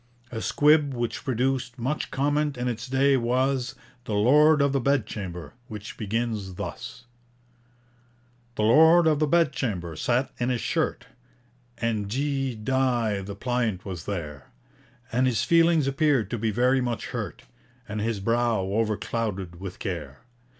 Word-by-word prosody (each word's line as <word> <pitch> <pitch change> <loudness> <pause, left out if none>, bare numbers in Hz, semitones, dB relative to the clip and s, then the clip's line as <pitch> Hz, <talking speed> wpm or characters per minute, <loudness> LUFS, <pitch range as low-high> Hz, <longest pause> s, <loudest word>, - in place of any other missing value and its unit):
A 115 -2 -4
squib 150 0 +3
which 120 -1 -3
produced 130 0 -1
much 130 +5 -2
comment 145 0 0
in 125 +1 -2
its 120 +1 -3
day 135 +1 +3
was 130 +2 0 0.3
'The 105 - -2
Lord 150 +8 +5
of 140 -1 +3
the 135 - +1
Bedchamber,' 105 -9 -2
which 105 -3 -8
begins 110 -3 -3
thus: 125 +6 -7 1.5
The 105 - -1
Lord 160 +9 +6
of 155 -2 +3
the 155 - +2
Bedchamber 130 - 0
sat 125 - 0
in 120 +1 0
his 125 -2 0
shirt, - - -1 0.7
(And 115 -3 -1
D 135 +1 -1
dy 120 -3 0
the 100 +1 -7
pliant 120 -4 -1
was 90 -5 -6
there), 80 -8 -5 0.6
And 125 +2 +2
his 120 -3 +1
feelings 165 -2 +4
appeared 135 -4 +1
to 120 - -2
be 110 +1 0
very 125 +4 +2
much 120 -2 -3
hurt - - -5 0.4
And 110 -1 -4
his 110 -1 -1
brow 115 +2 +1
overclouded 105 -3 -2
with 95 -1 -7
care. 75 -9 -5
120 Hz, 145 wpm, -26 LUFS, 105-135 Hz, 1.5 s, Lord